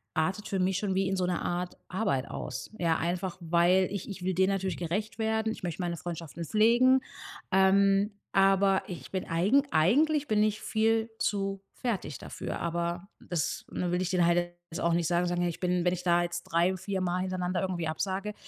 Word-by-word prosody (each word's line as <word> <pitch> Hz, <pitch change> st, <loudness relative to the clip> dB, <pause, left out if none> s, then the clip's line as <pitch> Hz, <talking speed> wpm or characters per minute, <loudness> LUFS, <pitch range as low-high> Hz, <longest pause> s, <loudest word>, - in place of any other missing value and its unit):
artet 185 Hz, +6 st, 0 dB
für 195 Hz, -, -1 dB
mich 185 Hz, 0 st, +1 dB
schon 195 Hz, -3 st, -1 dB
wie 190 Hz, 0 st, +1 dB
in 195 Hz, -, 0 dB
so 185 Hz, -, +1 dB
'ne 180 Hz, -1 st, -1 dB
Art 175 Hz, 0 st, -3 dB
Arbeit 180 Hz, -9 st, 0 dB
aus. -, -, -6 dB
Ja, 165 Hz, -2 st, +2 dB
einfach, 175 Hz, +2 st, -2 dB
weil 175 Hz, +3 st, +3 dB
ich 200 Hz, 0 st, -5 dB
ich 195 Hz, -2 st, -7 dB
will 185 Hz, 0 st, 0 dB
denen 190 Hz, +1 st, +3 dB
natürlich 190 Hz, -1 st, -2 dB
gerecht 200 Hz, +7 st, -3 dB
werden. 220 Hz, 0 st, 0 dB
Ich -, -, -11 dB
möchte 175 Hz, +1 st, -3 dB
meine 170 Hz, -1 st, -2 dB
Freundschaften 170 Hz, -1 st, -6 dB
pflegen. 240 Hz, -, +4 dB, 0.5 s
Ähm, 195 Hz, +2 st, +4 dB, 0.2 s
aber 195 Hz, 0 st, +4 dB
ich 180 Hz, -, -8 dB
bin, 190 Hz, -1 st, -3 dB
eigen 200 Hz, +12 st, +3 dB
eigentlich 290 Hz, -, +3 dB
bin 215 Hz, -1 st, +2 dB
ich 215 Hz, 0 st, 0 dB
viel 225 Hz, +1 st, +1 dB
zu 195 Hz, -1 st, -1 dB
fertig 195 Hz, -, -3 dB
dafür. -, -, -6 dB
Aber 170 Hz, +2 st, -2 dB
das 170 Hz, -5 st, -3 dB
ne, 180 Hz, -1 st, -2 dB
will 180 Hz, +1 st, +1 dB
ich 180 Hz, -, -1 dB
denen 180 Hz, -2 st, +3 dB
halt 175 Hz, 0 st, +2 dB, 0.2 s
jetzt 165 Hz, -, -4 dB
auch 170 Hz, 0 st, +2 dB
nicht 170 Hz, -1 st, +1 dB
sagen, 175 Hz, 0 st, +1 dB
so 175 Hz, -, -1 dB
ja, 175 Hz, 0 st, +1 dB
ich 170 Hz, -, -4 dB
bin 180 Hz, -1 st, +1 dB
wenn 180 Hz, -, +3 dB
ich 180 Hz, -, -5 dB
da 175 Hz, -1 st, +3 dB
jetzt 175 Hz, 0 st, -4 dB
3, 175 Hz, +3 st, +1 dB
4, 190 Hz, +1 st, -3 dB
Mal 180 Hz, 0 st, 0 dB
hintereinander 185 Hz, -1 st, -1 dB
irgendwie 180 Hz, -4 st, -2 dB
absage, 190 Hz, +6 st, -2 dB
185 Hz, 205 wpm, -29 LUFS, 175-200 Hz, 0.5 s, pflegen